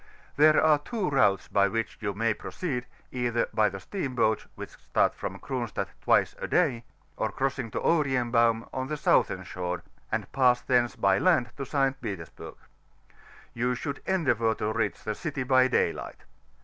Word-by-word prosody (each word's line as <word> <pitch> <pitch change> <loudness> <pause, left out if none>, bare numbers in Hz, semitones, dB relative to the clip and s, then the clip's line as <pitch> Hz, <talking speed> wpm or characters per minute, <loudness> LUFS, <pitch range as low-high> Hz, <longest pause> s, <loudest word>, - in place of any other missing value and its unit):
There 155 +1 +6
are 155 -2 +4
two 190 +1 -3
routes 100 -8 +3
b^ 100 0 +2
which 115 0 -3
you 100 -3 -2
may 115 +1 +1
proceed, 125 - -4 0.2
either 120 -2 0
by 110 -1 +3
the 95 0 -7
steam 135 - -4
boats, 110 -2 +1
whidi - - -8
start - - +1
from - - -6
Cronstadt 125 -4 -4
twice - - +3
a - - -4
day, 135 -10 +1 0.3
or 110 - -1
crossu^ 135 -1 -2
to - - -2
Orienbaum, 120 -7 +2
on 130 0 -3
the 150 +1 -3
southern - - +2
shore, 90 -1 -4 0.3
and - - -2
pass 125 -2 +4
thence 120 -2 +1
by 100 0 +2
land 125 -1 +2
to 135 -2 -6
St. 135 -1 0
Petersburg, 100 -8 -7
x - - -32 0.4
ou 125 +1 +1
should 140 +2 -5
endeavour 120 - +1
to 110 +1 -2
reach 110 -3 -2
the 110 - -2
city 145 +3 -4
hy 130 0 +4
daylight. 130 - -1
125 Hz, 170 wpm, -27 LUFS, 110-135 Hz, 0.4 s, There